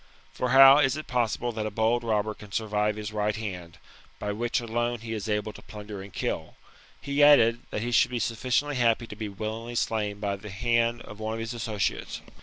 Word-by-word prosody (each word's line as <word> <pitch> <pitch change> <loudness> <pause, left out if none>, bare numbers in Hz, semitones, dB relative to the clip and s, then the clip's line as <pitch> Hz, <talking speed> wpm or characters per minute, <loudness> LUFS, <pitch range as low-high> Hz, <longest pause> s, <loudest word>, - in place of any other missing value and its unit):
For 125 - -2
how 135 +2 +9
is 140 0 +2
it 155 - -6
possible 120 0 -1
that 110 -1 -3
a - - -2
bold 110 +3 +1
robber 110 -1 0
can 105 -1 -14
survive 105 0 0
his 105 0 -6
right 105 0 0
hand, 90 -6 -6 0.4
by 105 - -3
which 120 +3 -1
alone 120 0 -2
he 115 0 -5
is 110 0 -4
able 105 0 -1
to - - -12
plunder 105 -2 -9
and 100 +1 -10
kill - - -2
1 - - -20 0.5
He 140 +1 +1
added, 120 -6 +6
that 105 - -3
he 120 - -2
should 120 - +4
be 125 - -3
sufficiently 130 +5 0
happy 115 -1 +2
to 105 - -9
be 105 -1 -5
willingly 110 +4 -5
slain 105 -3 -1
by 100 -1 -2
the 105 +2 -10
hand 115 +3 0
of 105 - -11
one 110 +1 -3
of - - -5
his 115 +1 -4
associates. 110 -4 -3
110 Hz, 215 wpm, -27 LUFS, 105-120 Hz, 0.5 s, how